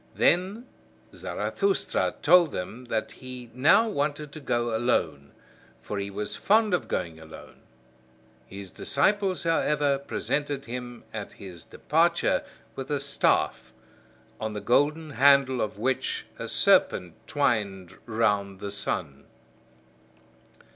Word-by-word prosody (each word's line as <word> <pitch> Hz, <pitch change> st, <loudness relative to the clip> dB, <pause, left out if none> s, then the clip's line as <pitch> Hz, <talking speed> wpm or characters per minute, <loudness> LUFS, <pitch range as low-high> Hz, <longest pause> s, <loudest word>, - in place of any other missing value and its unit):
Then 190 Hz, +7 st, +2 dB, 0.5 s
Zarathustra 395 Hz, -1 st, -1 dB
told 175 Hz, -4 st, +6 dB
them 115 Hz, +8 st, -6 dB
that 115 Hz, -2 st, -2 dB
he 125 Hz, -2 st, -10 dB
now 170 Hz, -, +5 dB
wanted 150 Hz, -5 st, -2 dB
to 155 Hz, -, -9 dB
go 120 Hz, -4 st, -1 dB
alone; 80 Hz, -, 0 dB, 0.5 s
for 100 Hz, +9 st, -4 dB
he 100 Hz, 0 st, -3 dB
was 105 Hz, +1 st, -4 dB
fond 215 Hz, 0 st, +3 dB
of 180 Hz, -, 0 dB
going 85 Hz, -3 st, -3 dB
alone. 80 Hz, 0 st, -13 dB, 0.9 s
His 95 Hz, -1 st, -9 dB
disciples, 190 Hz, +5 st, +1 dB
however, 150 Hz, -4 st, +2 dB
presented 140 Hz, 0 st, -2 dB
him 120 Hz, 0 st, -7 dB
at 105 Hz, -2 st, -6 dB
his 90 Hz, -4 st, -10 dB
departure -, -, +1 dB, 0.3 s
with 135 Hz, -1 st, -6 dB
a 145 Hz, -1 st, 0 dB
staff, 140 Hz, 0 st, +1 dB, 0.7 s
on 110 Hz, -1 st, -3 dB
the 105 Hz, -, -3 dB
golden 150 Hz, +7 st, +1 dB
handle 135 Hz, -1 st, +4 dB
of 105 Hz, -2 st, -3 dB
which 130 Hz, +4 st, -1 dB
a -, -, -4 dB
serpent 90 Hz, -2 st, +3 dB
twined 100 Hz, -10 st, -1 dB
round 105 Hz, -4 st, 0 dB
the 100 Hz, 0 st, -5 dB
sun. 75 Hz, -8 st, -3 dB
125 Hz, 120 wpm, -27 LUFS, 100-145 Hz, 0.9 s, told